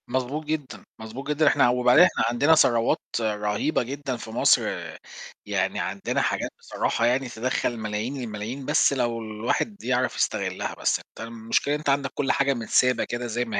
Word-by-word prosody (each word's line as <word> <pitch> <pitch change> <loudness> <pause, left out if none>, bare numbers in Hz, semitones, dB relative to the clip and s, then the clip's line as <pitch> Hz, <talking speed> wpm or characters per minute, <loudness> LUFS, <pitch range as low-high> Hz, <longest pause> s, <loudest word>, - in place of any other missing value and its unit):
مظبوط 130 +4 -2
جدًا، 145 -10 -4 0.2
مظبوط 115 +5 -8
جدًا. 150 +1 +2
إحنا 120 - +5
وبعدين 125 +5 +5
إحنا - - +2
عندنا 140 +7 +4
ثروات 120 -6 +3 0.2
رهيبة 105 +6 0
جدًا 135 0 -4
في 115 - -9
مصر، 115 - +4 0.8
يعني - - -1
عندنا - - -2
حاجات - - -1
بصراحة 115 - -1
يعني 125 +2 +1
تدخّل 120 0 -2
ملايين 110 +5 -3
الملايين، 115 +4 -5
بس 150 0 +3
لو 120 -3 -1
الواحد 115 - -3
يعرف 125 0 0
يستغلها، - - -1
بس - - 0
أنت - - -10
المشكلة 115 +5 -1
أنت 150 -1 -3
عندك 140 -1 +1
كل 135 - 0
حاجة 140 0 +2
متسابة 125 +1 +2
كده 120 0 -4
زي 120 +2 -1
ما 115 - -2
125 Hz, 165 wpm, -25 LUFS, 115-140 Hz, 0.8 s, إحنا